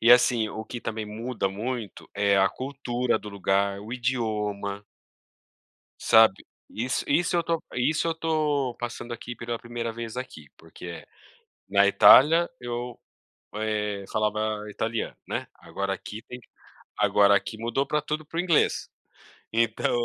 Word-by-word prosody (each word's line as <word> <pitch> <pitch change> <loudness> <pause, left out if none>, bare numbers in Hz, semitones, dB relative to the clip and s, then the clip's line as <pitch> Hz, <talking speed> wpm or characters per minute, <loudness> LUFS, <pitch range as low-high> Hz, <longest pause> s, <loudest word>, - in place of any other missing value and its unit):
E 115 +2 +7
assim, 120 -3 +4
o 110 +1 -6
que 120 - -7
também 110 -1 -4
muda 110 -1 -3
muito 110 +1 -5
é 100 -1 +3
a 95 0 +5
cultura 125 -3 -2
do 105 - -9
lugar, 100 0 0
o 110 +4 -8
idioma 105 -5 -2 1.1
Sabe 110 -4 +5 0.2
isso 125 +4 -2
isso 170 +4 +2
eu 170 - +4
estou 165 -1 -1
isso 150 +6 +1
eu 165 - +1
estou 150 -6 0
passando 120 0 -6
aqui 120 +1 -8
pela 120 0 -4
primeira 120 -1 -4
vez 115 0 -6
aqui, 80 - -7
porque 85 +1 -10 0.6
na 100 0 +5
Itália 160 +11 +7
eu, 120 0 -5 0.6
eh, 105 -2 -2
falava 110 0 -1
italiano, 110 +2 -3
né. - - -3
Agora 100 0 -4
aqui 105 +3 -8
tem 125 - -9 0.6
agora 100 -1 +5
aqui 110 - -2
mudou 120 +5 -1
para 150 0 0
tudo 150 +1 -3
para 165 +2 -8
o - - +2
inglês. 175 -3 +2 0.6
Então 115 -1 +1
115 Hz, 145 wpm, -26 LUFS, 105-125 Hz, 1.1 s, E